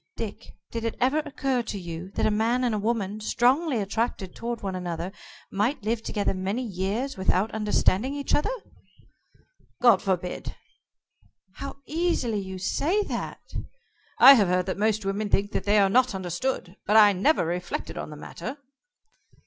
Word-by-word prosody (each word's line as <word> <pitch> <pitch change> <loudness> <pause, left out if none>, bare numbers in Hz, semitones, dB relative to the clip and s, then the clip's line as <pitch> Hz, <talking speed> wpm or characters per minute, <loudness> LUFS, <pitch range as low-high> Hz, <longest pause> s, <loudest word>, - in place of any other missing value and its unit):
Dick, - - -7 0.2
did 230 -1 -4
it 230 - -2
ever 265 +5 +3
occur 275 -4 -1
to 215 - -5
you 175 0 -6
that - - +1
a 215 - +3
man 230 +4 +1
and 220 -4 0
woman, 215 -2 -1
strongly 255 +6 +2
attracted 200 -2 -2
toward 235 0 -4
one 195 -1 -3
another, 180 0 -4 0.4
might 210 +6 0
live 220 +1 0
together 205 -3 -1
many 195 +6 -2
years 215 +6 -2
without 190 +2 +1
understanding 220 +3 +1
each 285 -1 -3
other?" 295 - +2 1.3
"God 235 -6 +6
forbid!" 180 -2 -2 1.0
"How 275 0 -7
easily 305 -9 0
you 190 -1 -6
say 320 - +1
that!" - - -6 0.6
"I 275 - +11
have 210 -8 +4
heard 180 0 +1
that 190 0 -3
most 215 -1 +1
women 200 +2 -1
think 200 0 +1
they 205 +1 +1
are 200 -1 +5
not 250 +2 +3
understood, 185 +1 -3
but 210 +2 +5
I 210 -2 +8
never 195 - +2
reflected 175 +2 -3
on - - -5
the 150 - -8
matter." 255 - -7
215 Hz, 155 wpm, -26 LUFS, 190-250 Hz, 1.3 s, I